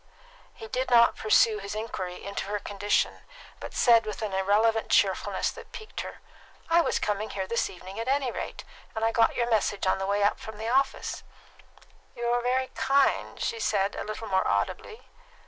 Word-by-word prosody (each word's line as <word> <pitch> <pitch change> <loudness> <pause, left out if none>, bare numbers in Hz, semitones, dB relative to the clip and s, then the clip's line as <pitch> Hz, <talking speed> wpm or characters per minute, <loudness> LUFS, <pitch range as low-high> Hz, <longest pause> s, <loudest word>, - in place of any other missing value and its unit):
He 225 - -9
did 255 +4 -2
not 235 -1 +6
pursue 215 0 +3
his 200 +1 -6
inquiry 190 -5 -5
into 200 -1 -4
her 205 +1 -2
condition, 205 0 0 0.4
but - - -8
said, 230 -2 +5
with 215 0 -4
an 210 -3 -3
irrelevant 210 +4 +2
cheerfulness - - +2
that - - -12
piqued 435 -1 -7
her, - - -9 0.5
"I 340 +1 +6
was - - 0
coming 210 +1 -2
here 190 -1 -3
this 235 +4 0
evening 190 +3 -9
at 230 - -4
any 270 -2 +1
rate, - - -6 0.3
and 220 0 0
I 225 - +2
got 230 0 +3
your 235 - 0
message 205 -2 +1
on 185 - +2
the 195 - -2
way 200 +1 +1
up 205 - +2
from 220 -1 -9
my 220 +1 -5
office." 270 +3 0 0.9
"You 240 - -4
are 245 0 +2
very 255 +2 0
kind," 275 +1 +1
she 230 - -2
said, 195 -2 0
a - - -4
little 215 +1 -6
more 190 0 +1
audibly. 440 - -2
220 Hz, 190 wpm, -27 LUFS, 200-240 Hz, 0.9 s, not